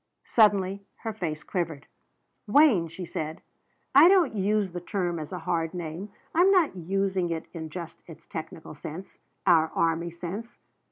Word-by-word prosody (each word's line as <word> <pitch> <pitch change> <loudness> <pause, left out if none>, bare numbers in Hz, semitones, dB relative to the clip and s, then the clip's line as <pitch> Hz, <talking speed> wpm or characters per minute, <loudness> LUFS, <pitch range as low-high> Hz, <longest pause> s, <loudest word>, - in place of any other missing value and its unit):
Suddenly 200 -3 +3 0.2
her 225 -2 -3
face 160 -7 -4
quivered. 165 -6 -3 0.6
"Wayne," 225 - +5
she 170 +3 -7
said, 155 -1 -5 0.5
"I - - +9
don't 370 -6 +5
use 205 -1 +1
the 175 0 -5
term 175 -3 -2
as 155 - -7
a 180 - -4
hard 165 -1 -2
name. 175 +4 -5 0.2
I'm 355 +4 +5
not 360 - +3
using 190 0 -1
it 165 -1 -3
in 160 -2 -6
just 170 +1 -8
its 165 -1 -13
technical 160 0 -7
sense, 160 +5 -9 0.3
our 165 -4 +4
army 165 +1 +1
sense. 185 +8 -7
180 Hz, 155 wpm, -27 LUFS, 165-205 Hz, 0.6 s, I